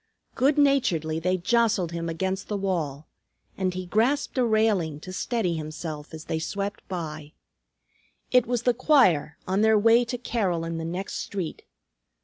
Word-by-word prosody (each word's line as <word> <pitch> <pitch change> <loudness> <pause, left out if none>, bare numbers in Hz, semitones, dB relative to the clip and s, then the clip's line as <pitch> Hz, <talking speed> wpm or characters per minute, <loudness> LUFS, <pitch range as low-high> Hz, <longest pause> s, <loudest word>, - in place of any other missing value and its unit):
Good 280 +3 +2
naturedly 215 - +2
they 180 +3 +1
jostled 215 -2 +1
him 170 0 -3
against 190 +4 -2
the 210 - -2
wall, 160 -7 -2 0.5
and 185 -1 0
he 185 0 -4
grasped 235 +10 +1
a - - +4
railing 215 -9 +1
to 185 - -8
steady 220 -3 -1
himself 155 -1 -6
as 160 -1 -9
they 160 - -2
swept 200 +5 -3
by. 155 -4 -6 1.0
It 250 -2 +4
was 240 -1 -1
the 245 - +3
choir 190 - +3
on 190 +2 +1
their 220 0 +5
way 230 +3 +5
to 245 +1 -3
carol 195 -9 -1
in 165 0 -3
the 165 - -4
next 180 +4 -4
street. 185 -6 -5
185 Hz, 160 wpm, -26 LUFS, 165-230 Hz, 1.0 s, their